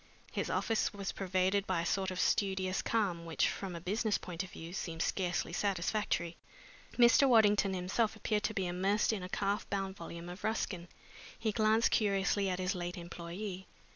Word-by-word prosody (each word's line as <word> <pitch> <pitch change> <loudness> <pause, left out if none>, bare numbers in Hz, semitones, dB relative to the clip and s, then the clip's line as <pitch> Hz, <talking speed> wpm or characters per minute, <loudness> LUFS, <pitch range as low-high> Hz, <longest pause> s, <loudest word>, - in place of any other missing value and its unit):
His - - -2
office 225 -1 +1
was 200 -1 -3
pervaded 190 +1 0
by 180 -3 +1
a - - -3
sort 190 +2 0
of 185 -1 -4
studious 190 -2 +1
calm 195 -7 0
which, 165 -1 +1
from 190 -3 -4
a - - -5
business 210 +5 0
point 170 -2 -5
of 190 - -6
view, 165 0 -9
seemed 165 -3 -3
scarcely 180 -3 -1
satisfactory. 185 -2 0 0.6
Mr. 245 +3 +6
Waddington 210 -4 +5
himself 200 +5 0
appeared 215 -1 0
to 220 - -1
be 190 - 0
immersed 195 +5 +1
in 205 - -3
a 180 - -6
calf 200 +1 -1
bound 195 -1 -2
volume 170 -1 -8
of 180 +2 -8
Ruskin. 185 -5 -2 0.5
He 225 -1 0
glanced 220 +1 +3
curiously 200 -1 +2
at 180 - -1
his 185 +1 0
late 175 -1 -4
employee. 180 +3 -6
190 Hz, 175 wpm, -33 LUFS, 180-210 Hz, 0.6 s, Mr